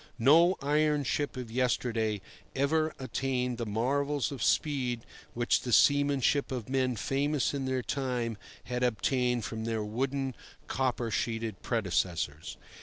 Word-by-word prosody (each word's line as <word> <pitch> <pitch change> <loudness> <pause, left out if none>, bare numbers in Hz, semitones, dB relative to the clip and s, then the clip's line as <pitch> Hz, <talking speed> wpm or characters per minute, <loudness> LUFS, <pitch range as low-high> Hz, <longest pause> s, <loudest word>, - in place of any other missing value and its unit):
No 165 +9 +6
iron 150 0 +2
ship 145 +1 -1
of 125 -3 -6
yesterday 115 -4 0 0.3
ever 155 +3 +2
attained 130 -2 -2
the 115 - -2
marvels 140 +6 0
of 135 -5 -6
speed 125 -6 +1 0.3
which 120 0 +2
the 125 - -4
seamanship 140 +2 +3
of 125 -5 -4
men 130 -2 +1
famous 140 +6 0
in 140 -2 -2
their 130 -1 -1
time 125 -5 -2 0.2
had 125 0 -3
obtained 125 0 +1
from 110 0 -4
their 115 -2 -1
wooden, 135 +5 -2 0.3
copper 125 -3 -1
sheeted 115 -1 -2
predecessors. 90 - -1
125 Hz, 130 wpm, -30 LUFS, 115-140 Hz, 0.3 s, No